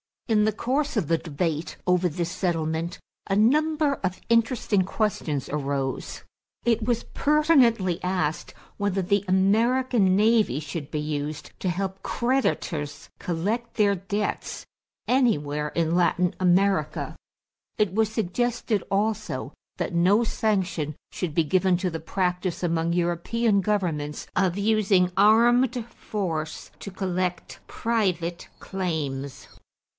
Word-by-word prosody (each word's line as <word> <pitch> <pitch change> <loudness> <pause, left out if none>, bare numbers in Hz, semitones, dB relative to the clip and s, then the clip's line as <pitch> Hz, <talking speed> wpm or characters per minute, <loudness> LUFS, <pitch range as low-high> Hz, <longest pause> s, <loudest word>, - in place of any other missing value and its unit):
In 215 -3 +3
the 215 - +1
course 275 +7 -1
of 195 -10 0
the 165 - +3
debate 160 0 -3
over 180 0 +3
this 170 +1 -3
settlement, 165 -1 -1 0.3
a 195 - +1
number 300 +6 +3
of 185 -5 -4
interesting 230 -4 +2
questions 180 - -2
arose. 140 -2 -3 0.4
It 230 -2 +2
was 235 0 0
pertinently 260 - +3
asked 180 -4 -2 0.2
whether 200 -1 0
the 200 +2 +1
American 210 +2 +3
navy 215 - +3
should 150 0 -6
be 150 -1 -2
used 150 0 -4
to 185 - -1
help 190 +2 -3
creditors 175 - -1
collect 210 +8 -2
their 205 -2 +3
debts 200 +2 -3 0.4
anywhere 150 - +1
in 165 0 +1
Latin 180 +1 +2
America. 185 -3 +1 0.6
It 210 -5 +1
was 220 +1 +2
suggested 220 0 -1
also 210 +2 -1 0.2
that - - -3
no 185 +7 +4
sanction 190 -10 -1 0.2
should 165 -5 -4
be 165 - +4
given 185 +3 +2
to 185 +1 -1
the 165 - -4
practice 180 +2 -2
among 165 -1 +1
European 180 +6 +1
governments 170 -8 -2
of 185 -1 +1
using 200 -3 +3
armed 235 +4 +4
force 165 -10 -4
to - - -7
collect 185 -2 -3
private 180 -7 -1
claims. 145 -8 -4
190 Hz, 120 wpm, -25 LUFS, 170-220 Hz, 0.6 s, no